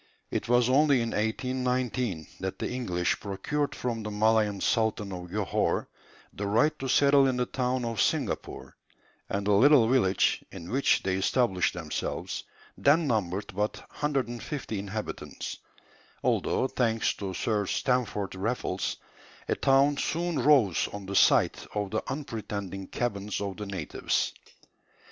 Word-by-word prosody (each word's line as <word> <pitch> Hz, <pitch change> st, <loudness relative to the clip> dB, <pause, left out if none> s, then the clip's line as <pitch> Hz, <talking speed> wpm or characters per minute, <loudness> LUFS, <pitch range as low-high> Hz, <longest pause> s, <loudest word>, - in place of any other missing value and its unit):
It 110 Hz, -, -2 dB
was 120 Hz, -1 st, +4 dB
only 140 Hz, +1 st, +4 dB
in 115 Hz, -, -2 dB
1819 125 Hz, -, -1 dB
that 95 Hz, 0 st, -4 dB
the -, -, -2 dB
English 90 Hz, -9 st, -1 dB
procured 125 Hz, +9 st, -2 dB
from 120 Hz, -2 st, -3 dB
the 105 Hz, -, -4 dB
Malayan 105 Hz, -1 st, +2 dB
sultan 110 Hz, -2 st, 0 dB
of 90 Hz, -1 st, -7 dB
Johore 100 Hz, 0 st, 0 dB, 0.4 s
the 100 Hz, -, -4 dB
right 115 Hz, +10 st, +3 dB
to 135 Hz, -, -3 dB
settle 140 Hz, +1 st, +5 dB
in 130 Hz, -1 st, 0 dB
the 125 Hz, -, +1 dB
town 125 Hz, 0 st, -1 dB
of 115 Hz, -3 st, -1 dB
Singapore; -, -, -2 dB, 0.5 s
and 100 Hz, 0 st, -2 dB
the 105 Hz, -, +2 dB
little 125 Hz, +3 st, +6 dB
village 115 Hz, -7 st, +2 dB
in 90 Hz, -3 st, -8 dB
which 135 Hz, +3 st, +2 dB
they 95 Hz, -1 st, 0 dB
established 95 Hz, -3 st, +1 dB
themselves 80 Hz, -4 st, -4 dB, 0.3 s
then 155 Hz, +4 st, +4 dB
numbered 100 Hz, -7 st, -1 dB
but 105 Hz, +2 st, -1 dB
150 135 Hz, -4 st, -3 dB
inhabitants, 100 Hz, +2 st, -5 dB, 0.6 s
although, 130 Hz, -, +1 dB
thanks 115 Hz, -4 st, +1 dB
to 95 Hz, -2 st, -5 dB
Sir 105 Hz, 0 st, 0 dB
Stamford 110 Hz, -6 st, 0 dB
Raffles, 100 Hz, -1 st, -2 dB, 0.5 s
a -, -, +2 dB
town 140 Hz, +2 st, +3 dB
soon 170 Hz, 0 st, -1 dB
rose 125 Hz, -, +4 dB
on 100 Hz, -1 st, -7 dB
the 100 Hz, +1 st, -5 dB
site -, -, +4 dB
of 105 Hz, -2 st, -2 dB
the 110 Hz, -, 0 dB
unpretending 105 Hz, -, -5 dB
cabins 105 Hz, -4 st, -2 dB
of 100 Hz, -1 st, -4 dB
the 105 Hz, -1 st, -5 dB
natives. 95 Hz, -6 st, -1 dB
110 Hz, 140 wpm, -28 LUFS, 100-130 Hz, 0.6 s, little